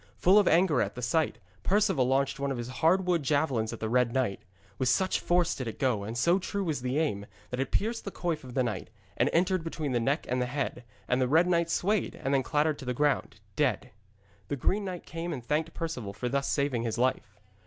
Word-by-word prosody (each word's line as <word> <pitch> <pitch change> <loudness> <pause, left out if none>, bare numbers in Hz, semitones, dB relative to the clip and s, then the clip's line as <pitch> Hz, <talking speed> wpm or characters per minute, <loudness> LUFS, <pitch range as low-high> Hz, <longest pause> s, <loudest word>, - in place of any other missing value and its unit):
Full 190 +4 +6
of 205 - +2
anger 170 -1 +4
at - - -2
the 125 - -6
sight, 155 +6 +1 0.2
Perceval 180 - +2
launched 135 +1 +1
one 140 0 -1
of 135 - -2
his 120 +1 -5
hard 180 +4 +4
wood 175 -2 +2
javelins 135 -6 +1
at 115 - -7
the 110 - -2
red 125 +1 +2
knight. 120 -6 -1 0.4
With 130 -2 +2
such 185 +8 +2
force 175 -1 +2
did 130 - -5
it 110 - -5
go, 125 -7 +1
and 110 +3 -5
so 170 +9 +3
true 200 +1 -3
was 155 -8 -2
the 130 +2 -1
aim, 105 -11 -1 0.2
that 125 - -3
it 135 - -1
pierced 225 +2 0
the 200 - -4
coif 165 -5 -3
of 125 -2 -10
the 130 - +3
knight, 105 -6 -3 0.3
and - - +2
entered 180 +1 +2
between 160 -3 -3
the 120 - +1
neck 140 +7 0
and 125 +1 0
the 125 - 0
head, 130 -2 -3 0.2
and 125 +1 +1
the 130 - +3
red 160 +6 +4
knight 170 -2 +1
swayed 200 +4 0
and 135 - -2
then 135 - +4
clattered 150 +2 0
to 135 - -8
the 125 0 -2
ground, 140 -6 0
dead. 135 -9 0 0.6
The 145 - -2
green 200 - 0
knight 180 -2 -5
came 165 +1 -5
and 125 -7 -5
thanked 155 +4 0
Perceval 130 -12 -4
for 125 +5 -4
thus 140 +2 0
saving 140 -5 0
his 115 -1 -2
life. 125 -5 -1
140 Hz, 240 wpm, -29 LUFS, 125-170 Hz, 0.6 s, Full